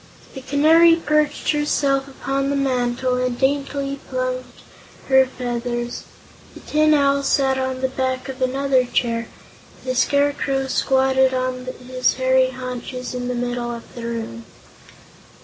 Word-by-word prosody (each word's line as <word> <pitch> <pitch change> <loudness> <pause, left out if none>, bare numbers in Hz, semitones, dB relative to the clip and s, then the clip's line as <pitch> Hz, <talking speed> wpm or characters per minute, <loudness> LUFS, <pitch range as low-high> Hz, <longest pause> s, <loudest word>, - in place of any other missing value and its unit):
The 265 - -8
Canary 320 +5 +5
perched 305 -2 0
herself 280 -2 +1
upon 275 0 -2
the 280 - 0
mantel 255 -2 0
and 250 -1 -1
daintily 275 0 -1
plumed 255 0 -2 0.6
her 265 -1 +5
feathers; 240 -1 -4 0.5
the - - -10
Tin 305 0 +3
Owl 280 -1 +3
sat 270 -1 +1
on 260 0 -2
the 260 - +2
back 260 0 -2
of 265 0 -7
another 265 0 +2
chair; 235 -1 -1 0.6
the 255 - -1
Scarecrow 280 0 +1
squatted 265 0 +2
on 255 0 -2 0.2
his 255 0 +1
hairy 260 0 +3
haunches 255 0 -6
in 250 0 -4
the 250 - -2
middle 245 0 -2
of 235 -1 -8
the 240 - -8
room. 225 - -5
260 Hz, 135 wpm, -21 LUFS, 250-275 Hz, 0.6 s, Canary